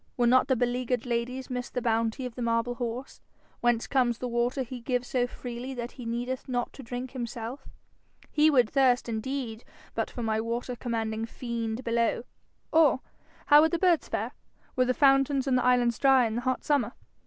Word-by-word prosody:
Would 240 Hz, -1 st, +3 dB
not 255 Hz, +1 st, +5 dB
the 260 Hz, -, +3 dB
beleaguered 245 Hz, 0 st, -1 dB
ladies 250 Hz, +2 st, -3 dB
miss 250 Hz, -1 st, -3 dB
the -, -, -2 dB
bounty 230 Hz, +1 st, 0 dB
of 250 Hz, -, -5 dB
the 245 Hz, -, -7 dB
marble 230 Hz, +1 st, +1 dB
horse? 245 Hz, +1 st, -5 dB, 0.4 s
Whence 240 Hz, -1 st, +2 dB
comes 245 Hz, -4 st, +1 dB
the 250 Hz, -, -4 dB
water 240 Hz, +3 st, 0 dB
he 250 Hz, 0 st, -8 dB
gives 250 Hz, 0 st, -1 dB
so 245 Hz, -1 st, +1 dB
freely 245 Hz, +2 st, -6 dB
that 240 Hz, 0 st, -5 dB
he 245 Hz, -3 st, -9 dB
needeth 245 Hz, +3 st, -3 dB
not 245 Hz, -1 st, -2 dB
to -, -, -10 dB
drink 245 Hz, +1 st, -5 dB
himself? 240 Hz, 0 st, -6 dB, 0.6 s
He 305 Hz, +1 st, +5 dB
would 250 Hz, -6 st, +4 dB
thirst 255 Hz, -1 st, +3 dB
indeed 235 Hz, 0 st, -4 dB, 0.3 s
but -, -, -1 dB
for 240 Hz, -, -6 dB
my 220 Hz, -1 st, 0 dB
water 235 Hz, +2 st, -3 dB
commanding 225 Hz, -2 st, -2 dB
fiend 235 Hz, 0 st, -4 dB
below. 230 Hz, 0 st, +1 dB, 0.5 s
Or 310 Hz, -5 st, +5 dB, 0.4 s
how 295 Hz, +1 st, +8 dB
would 320 Hz, -, +4 dB
the 340 Hz, -, 0 dB
birds 345 Hz, -2 st, +3 dB
fare, -, -, -2 dB, 0.4 s
were 255 Hz, -, +3 dB
the 255 Hz, 0 st, +1 dB
fountains 275 Hz, +1 st, +3 dB
on 265 Hz, -, +2 dB
the 250 Hz, -, +3 dB
islands 245 Hz, -2 st, +3 dB
dry 270 Hz, -2 st, +5 dB
in 220 Hz, -, -2 dB
the 240 Hz, -, -2 dB
hot 255 Hz, +1 st, -1 dB
summer? 275 Hz, -6 st, +1 dB
245 Hz, 190 wpm, -28 LUFS, 235-260 Hz, 0.6 s, how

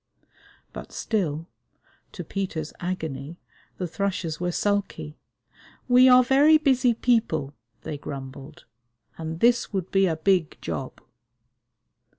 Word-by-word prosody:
But -, -, -9 dB
still, 165 Hz, -8 st, -2 dB, 0.7 s
to -, -, -6 dB
Peter's 175 Hz, -6 st, -4 dB
agony, 160 Hz, -4 st, -5 dB, 0.4 s
the 180 Hz, -, -3 dB
thrushes 180 Hz, -3 st, -3 dB
were 175 Hz, 0 st, -1 dB
sulky. 185 Hz, -6 st, -2 dB, 0.7 s
"We 255 Hz, +1 st, +7 dB
are 255 Hz, 0 st, +7 dB
very 285 Hz, +5 st, +5 dB
busy 260 Hz, -5 st, +2 dB
people," 220 Hz, -, +1 dB, 0.3 s
they 150 Hz, -, -5 dB
grumbled, 140 Hz, +1 st, -9 dB, 0.5 s
"and 160 Hz, +1 st, -5 dB
this 240 Hz, +1 st, +3 dB
would 190 Hz, -3 st, -3 dB
be 195 Hz, -1 st, +3 dB
a 165 Hz, -, 0 dB
big 175 Hz, 0 st, +1 dB
job." -, -, -5 dB
180 Hz, 115 wpm, -25 LUFS, 155-230 Hz, 0.7 s, We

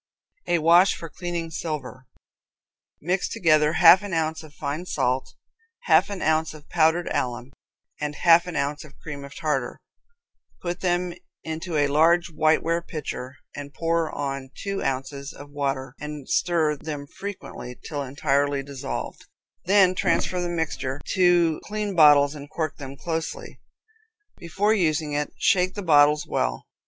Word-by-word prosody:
A 175 Hz, -, +3 dB
Wash 170 Hz, +4 st, +5 dB
for 165 Hz, -, -8 dB
Cleaning 170 Hz, -1 st, -5 dB
Silver. 150 Hz, -5 st, -5 dB, 0.9 s
Mix 180 Hz, +4 st, -1 dB
together 155 Hz, -7 st, +3 dB
half 175 Hz, +2 st, +8 dB
an 205 Hz, -3 st, -6 dB
ounce 160 Hz, 0 st, -1 dB
of 155 Hz, -2 st, -13 dB
fine 155 Hz, +5 st, -4 dB
salt, 130 Hz, -3 st, -1 dB, 0.5 s
half -, -, +4 dB
an 200 Hz, -2 st, -5 dB
ounce 160 Hz, 0 st, +1 dB
of 150 Hz, -1 st, -14 dB
powdered 165 Hz, +1 st, +2 dB
alum, 125 Hz, +1 st, -3 dB, 0.5 s
and 150 Hz, 0 st, -3 dB
half 170 Hz, +2 st, +5 dB
an 175 Hz, -, -5 dB
ounce 145 Hz, +1 st, -2 dB
of 150 Hz, -2 st, -16 dB
cream 145 Hz, -3 st, -8 dB
of 140 Hz, -, -11 dB
tartar. 135 Hz, -5 st, -2 dB, 0.8 s
Put 175 Hz, 0 st, -4 dB
them 175 Hz, -1 st, 0 dB, 0.3 s
into 160 Hz, +1 st, -4 dB
a 145 Hz, -, +3 dB
large 165 Hz, +4 st, +3 dB
white 155 Hz, 0 st, +2 dB
ware 165 Hz, +1 st, 0 dB
pitcher, 135 Hz, -5 st, -6 dB, 0.2 s
and 145 Hz, -1 st, -8 dB
pour 165 Hz, -1 st, 0 dB
on 135 Hz, -2 st, -4 dB
two 200 Hz, -1 st, -4 dB
ounces 140 Hz, +2 st, -3 dB
of 145 Hz, 0 st, -12 dB
water, 135 Hz, -3 st, -3 dB
and 150 Hz, -2 st, -7 dB
stir 160 Hz, -4 st, +1 dB
them 145 Hz, -1 st, -6 dB
frequently, 160 Hz, -8 st, -8 dB
till 145 Hz, -2 st, -3 dB
entirely 140 Hz, 0 st, 0 dB
dissolved. 140 Hz, -1 st, -6 dB, 0.4 s
Then 190 Hz, -1 st, +5 dB
transfer 180 Hz, 0 st, 0 dB
the 175 Hz, -, -2 dB
mixture 145 Hz, -5 st, -3 dB
to 175 Hz, -4 st, +3 dB
clean 210 Hz, -1 st, -3 dB
bottles 145 Hz, -3 st, +6 dB
and 145 Hz, -1 st, -10 dB
cork 155 Hz, -1 st, -3 dB
them 135 Hz, -1 st, -8 dB
closely. 160 Hz, +2 st, -5 dB, 0.8 s
Before 195 Hz, +6 st, +1 dB
using 155 Hz, -6 st, 0 dB
it, 145 Hz, 0 st, -1 dB
shake 185 Hz, -3 st, +2 dB
the 205 Hz, -, -4 dB
bottles 150 Hz, -2 st, +5 dB
well. -, -, -2 dB
155 Hz, 150 wpm, -24 LUFS, 145-175 Hz, 0.9 s, half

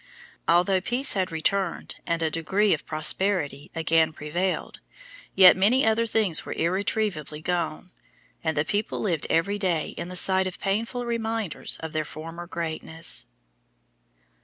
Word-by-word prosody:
Although 180 Hz, +3 st, +3 dB
peace 245 Hz, +8 st, +2 dB
had 185 Hz, -3 st, -1 dB
returned 175 Hz, +3 st, -1 dB
and 170 Hz, 0 st, 0 dB
a 160 Hz, -, 0 dB
degree 195 Hz, +6 st, +1 dB
of 155 Hz, -, -4 dB
prosperity 155 Hz, -1 st, 0 dB
again 160 Hz, 0 st, +2 dB
prevailed, 175 Hz, +6 st, -3 dB, 0.6 s
yet 185 Hz, -2 st, +9 dB
many 225 Hz, +8 st, +3 dB
other 225 Hz, +1 st, +2 dB
things 210 Hz, -7 st, +2 dB
were -, -, -5 dB
irretrievably 180 Hz, -3 st, -1 dB
gone, 175 Hz, +1 st, -2 dB, 0.5 s
and 160 Hz, -2 st, -1 dB
the 150 Hz, -, +2 dB
people 205 Hz, +5 st, -2 dB
lived 170 Hz, -8 st, -1 dB
every 200 Hz, +5 st, +1 dB
day 175 Hz, -6 st, 0 dB
in -, -, -6 dB
the 180 Hz, -, -7 dB
sight 190 Hz, +1 st, +3 dB
of 185 Hz, -, -6 dB
painful 230 Hz, +5 st, -2 dB
reminders 225 Hz, -6 st, -2 dB
of 160 Hz, -1 st, -6 dB
their 155 Hz, 0 st, 0 dB
former 165 Hz, +3 st, -8 dB
greatness. 165 Hz, -1 st, -2 dB
180 Hz, 140 wpm, -25 LUFS, 160-205 Hz, 0.6 s, yet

